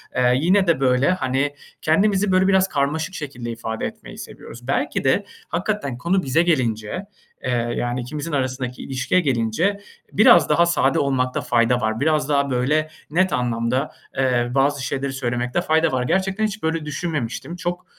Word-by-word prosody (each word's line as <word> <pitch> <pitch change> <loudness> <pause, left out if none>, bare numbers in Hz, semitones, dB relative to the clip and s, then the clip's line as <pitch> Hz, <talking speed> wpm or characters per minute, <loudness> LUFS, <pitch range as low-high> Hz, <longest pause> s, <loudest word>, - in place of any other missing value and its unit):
eee, 125 -1 +3
yine, 185 +3 +3
de 165 -4 +3
böyle, 130 +2 +3
hani, 145 -3 -1 0.3
kendimizi 195 +4 +2
böyle 185 0 +4
biraz 190 -1 +4
karmaşık 155 +2 -1
şekilde 125 -6 -6
ifade 110 -1 -4
etmeyi - - -8
seviyoruz. 120 +2 -10
Belki 140 +1 -1
de 135 +10 +2 0.2
hakikaten 175 - -2
konu 180 +7 0
bize 135 +5 +2
gelince, 130 - -1 0.4
eee, 125 - -1 0.2
yani, 120 +1 -2
ikimizin 150 +6 -5
arasındaki 130 -2 -2
ilişkiye 135 +7 0
gelince 140 - 0 0.3
biraz 235 +4 +6
daha 170 - +4
sade 155 -5 +2
olmakta 130 -2 0
fayda 120 +1 +2
var. 110 0 -1
Biraz 150 -1 +1
daha 140 -1 +2
böyle 145 +5 +1 0.2
net 185 +4 +2
anlamda, 120 +1 0 0.3
eee, 125 -2 +1
bazı 140 0 +2
şeyleri 135 0 -2
söylemekte 125 -1 -1
fayda 160 +1 +2
var. 130 -1 0
Gerçekten 190 - 0
hiç 215 -2 -4
böyle 160 -1 -1
düşünmemiştim. 150 -1 -4
Çok, 175 +1 -4
140 Hz, 155 wpm, -22 LUFS, 125-170 Hz, 0.4 s, biraz